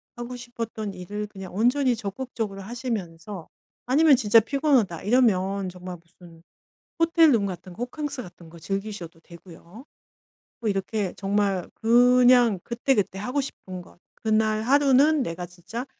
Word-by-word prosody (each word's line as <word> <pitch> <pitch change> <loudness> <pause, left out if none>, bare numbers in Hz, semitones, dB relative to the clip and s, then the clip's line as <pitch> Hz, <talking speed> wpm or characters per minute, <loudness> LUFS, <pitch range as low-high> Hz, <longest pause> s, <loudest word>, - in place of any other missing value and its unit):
하고 240 +1 -6
싶었던 230 -4 -6
일을 205 +4 -5
그냥 190 -3 -10
온전히 250 +4 +2
적극적으로 215 -1 -5
하시면서 205 -6 -5 0.4
아니면 285 +3 +5
진짜 225 -1 +5
피곤하다 255 - +1
이러면 200 -4 +2
정말 180 0 -8
무슨 170 -1 -18 0.6
호텔 330 -1 +5
룸 215 -4 +2
같은 180 -1 -7
거 235 - -6
호캉스 285 0 -5
같은 175 -4 -14
거 170 +1 -13
즐기셔도 195 -2 -5
되고요. 170 - -14 0.8
뭐 220 - 0
이렇게 195 0 -2
정말 195 -2 0
그냥 245 -2 +5
그때, 245 +3 0
그때 195 -2 -1
하고 250 +7 -1
싶은 185 -9 -8
것 - - -18 0.2
그날 215 -1 +1
하루는 280 +3 +4
'내가 175 -1 -5
진짜 185 +8 -7
215 Hz, 310 characters per minute, -25 LUFS, 185-250 Hz, 0.8 s, 아니면